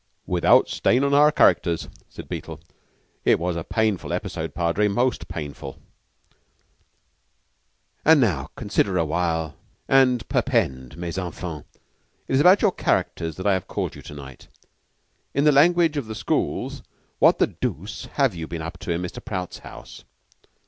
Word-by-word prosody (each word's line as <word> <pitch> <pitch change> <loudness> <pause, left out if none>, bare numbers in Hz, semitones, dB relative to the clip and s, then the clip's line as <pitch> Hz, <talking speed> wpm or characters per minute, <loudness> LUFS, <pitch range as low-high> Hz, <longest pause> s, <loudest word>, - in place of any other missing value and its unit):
"Without 90 -2 +4
a - - -8
stain 125 +3 +2
on 140 0 +1
our 150 +1 +6
characters," 85 - +2 0.2
said - - -10
Beetle. - - -6 0.6
"It - - +4
was 90 +1 -1
a 85 - -3
painful 110 -2 -1
episode, 80 -2 -4
Padre, 85 +5 +1
most 120 +5 0
painful." 75 -3 -7 2.3
"Now, 110 - +3
consider 100 -3 0
for - - +1
a 85 - +2
while, 80 -1 -1 0.3
and 125 -4 +3
perpend, 65 +2 -1
mes 85 +1 -4
enfants. 85 -4 -6 0.6
It - - -3
is 135 - +4
about 180 +5 +6
your 210 - +5
characters 80 - -1
that 95 - -7
I've 95 -3 +1
called - - -3
to - - -11
night. 70 -2 -11 0.9
In 140 - +2
the 150 - +6
language 165 +2 +4
of 135 -6 -3
the 110 - -6
schools, - - -2 0.4
what - - +5
the - - +4
dooce 90 +2 -5
have 135 -6 +2
you 80 -2 -6
been 80 -1 -5
up 85 +3 -7
to - - -4
in 85 +1 -1
Mr. 90 - -7
Prout's 90 -3 -5
house? - - -12
90 Hz, 155 wpm, -23 LUFS, 85-130 Hz, 2.3 s, our